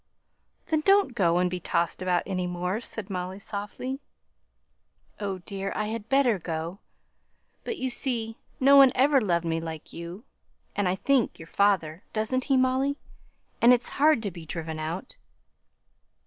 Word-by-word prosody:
"Then, 315 -1 +1
don't 390 -5 +4
go 175 -6 +2
and 180 0 +3
be 180 0 -3
tossed 170 0 -1
about 180 -1 +1
any 185 -2 -2
more," 180 +4 -2
said 220 -4 -6
Molly, 185 0 -4
softly. 210 +6 -5 1.2
"Oh, 195 -2 -2
dear! 195 -1 -4
I 215 0 -1
had 225 0 -5
better 265 -7 +3
go. 165 +3 -4 0.8
But, 460 - -4
you 260 -1 -1
see, 230 -3 -1 0.2
no 275 +1 +6
one 270 -2 +8
ever 275 +1 +4
loved 170 -5 +1
me 165 0 -1
like 160 -1 -7
you, 170 +5 -8 0.5
and, 200 -3 +1
I 180 - +1
think, 265 +4 +1
your 160 - -10
father 185 -4 +1
doesn't 230 +4 0
he, 270 - +3
Molly? 260 +2 +2 0.6
And 240 +2 +8
it's 245 - 0
hard 295 -5 +3
to 200 - -2
be 170 -1 -10
driven 160 0 -5
out." 165 +8 -5
200 Hz, 160 wpm, -27 LUFS, 175-255 Hz, 1.2 s, one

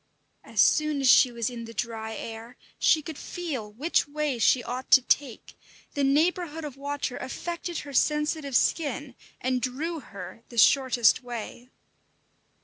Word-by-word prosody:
As - - -6
soon 305 -2 +4
as 270 - +1
she 250 +1 +7
was 235 -2 -2
in 235 -2 -5
the 230 0 -11
dry 220 0 -4
air, 225 +3 -8 0.2
she 310 - +4
could 315 -1 -7
feel 275 -12 -5
which 290 +11 0
way 290 -3 -2
she 245 +2 +4
ought 250 +2 -5
to 260 - +7
take; 260 -3 -1 0.4
the 285 - -1
neighbourhood 320 +3 +1
of 285 -4 -7
water 285 -2 -4
affected 340 +5 -5
her 285 -1 -10
sensitive 300 -1 0
skin 290 -3 0 0.3
and 255 0 -1
drew 305 +7 -3
her 200 -3 -10
the 235 - -11
shortest 250 0 +4
way. 245 0 -7
265 Hz, 150 wpm, -27 LUFS, 240-300 Hz, 0.4 s, she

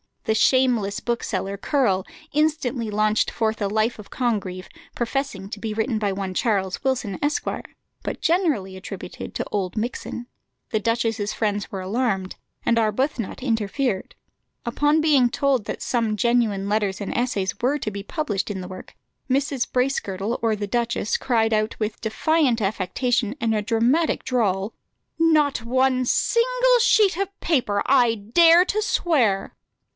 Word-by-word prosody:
The 220 - +1
shameless 230 -3 +2
bookseller, 200 -5 -2
Curll, 200 -6 +1 0.3
instantly 290 -6 0
launched 215 +1 +2
forth 220 -1 -1
a 200 - +1
life 220 +3 0
of 210 - -11
Congreve, 195 -7 -2 0.3
professing 240 -5 -2
to 210 - -6
be 220 0 -3
written 220 +1 0
by 205 -2 0
one 190 -1 -4
Charles 190 -3 0
Wilson, 250 -7 -1
Esq., 295 +1 0 0.6
but - - -5
generally 315 - +1
attributed 190 -1 -8
to - - -2
Oldmixon. 215 +4 -3 0.4
The 215 - 0
duchess's 225 -1 0
friends 205 -2 -2
were 195 - -4
alarmed, 195 -2 -1 0.3
and 235 - +3
Arbuthnot 230 +2 -1
interfered. 225 -2 -1 0.5
Upon 295 +6 +2
being 285 -6 +4
told 265 -3 +1
that - - -5
some 230 -3 0
genuine 215 -3 +1
letters 205 -2 0
and 200 - -4
essays 210 -6 -1
were 265 +5 +2
to 220 -7 -4
be 200 0 -5
published 215 - -2
in 195 -2 -4
the 180 - -7
work, 185 0 -10 0.3
Mrs. 270 -1 0
Bracegirdle 230 -5 -1
or 225 -1 +2
the 205 0 -3
duchess 235 0 0
cried 225 -3 +1
out 215 0 0
with 215 -1 -3
defiant 250 +2 +1
affectation 220 +4 0
and 225 -1 +1
a 215 - +1
dramatic 235 +10 +1
drawl, 210 -5 0 0.5
"Not 305 -6 +3
one 255 +1 +2
single - - +3
sheet 430 -5 +4
of 395 0 -3
paper, 240 -11 +1
I 245 -4 +4
dare 330 - +5
to 425 +3 0
swear." 275 - +1
230 Hz, 145 wpm, -23 LUFS, 205-265 Hz, 0.6 s, dare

